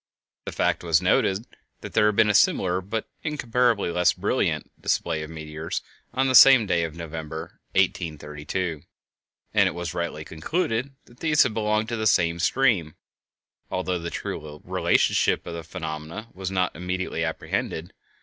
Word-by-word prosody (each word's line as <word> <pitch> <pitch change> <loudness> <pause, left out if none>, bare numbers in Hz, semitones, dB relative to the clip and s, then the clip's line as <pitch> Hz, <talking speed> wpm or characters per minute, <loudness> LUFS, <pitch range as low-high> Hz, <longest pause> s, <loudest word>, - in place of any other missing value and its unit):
The - - -4
fact - - 0
was 80 -3 +4
noted 95 +4 +2 0.4
that - - -8
there 105 - +4
had 105 - +1
been 110 -1 +5
a - - -1
similar, 90 -2 +3
but 105 +4 -4
incomparably 125 - +1
less 90 +1 +3
brilliant, - - -1
display 80 -2 0
of 80 - -6
meteors 80 0 -5 0.3
on 130 +2 +1
the 130 - +1
same 130 -1 +9
day 85 -4 +1
of 80 -1 -4
November, 80 -1 -7
1832, 75 +1 -1 0.7
and - - +4
it - - -8
was 85 -2 -4
rightly 85 -3 -3
concluded 125 - -2
that 120 - -20
these 155 -2 +4
had 130 -5 -1
belonged 110 0 0
to 115 - -2
the 110 0 +1
same 85 -4 +3
stream, 90 - +2 0.7
although 90 -1 -1
the 85 0 -4
true 75 -2 -6
relationship - - +2
of 85 - -6
the 85 0 -6
phenomena 80 +5 -6
was 95 0 -4
not 95 -1 0
immediately 90 -1 -3
apprehended. 80 0 -3
90 Hz, 160 wpm, -25 LUFS, 80-110 Hz, 0.7 s, same